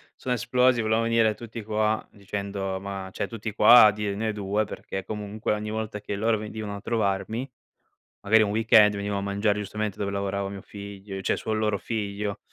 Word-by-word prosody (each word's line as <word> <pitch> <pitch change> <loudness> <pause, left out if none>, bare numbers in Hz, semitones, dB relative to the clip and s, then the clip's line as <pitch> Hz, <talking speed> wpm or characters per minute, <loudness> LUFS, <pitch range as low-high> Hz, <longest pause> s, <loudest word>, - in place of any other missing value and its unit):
Sono 125 -1 -2
esplosi, 125 0 +3
volevano 110 +1 +1
venire 115 -1 +3
tutti 115 0 -8
qua 110 0 0
dicendo 100 -1 -4
ma 95 -1 -6
cioè - - -3
tutti 110 -2 -5
qua 110 +1 +9
a 105 - +6
dirne 105 +1 -2
2, 105 +1 -1
perché, 95 -1 -6
comunque, 105 0 -3
ogni 105 0 -3
volta 110 -1 -3
che 105 - -5
loro 110 +2 +1
venivano 105 -1 -5
a 100 - -8
trovarmi, 110 +3 -1 0.7
magari, 110 +2 +5
un 100 - 0
weekend 105 -1 +5
venivo 100 0 -2
a - - -2
mangiare 100 +1 0
giustamente 105 0 -3
dove 100 -1 -1
lavorava 100 0 -2
mio 100 -1 -7
figl 100 -1 -8
cioè 95 - +1
suo 110 - -3
loro 105 -1 +1
figlio, 100 0 -3
105 Hz, 180 wpm, -26 LUFS, 100-110 Hz, 0.7 s, qua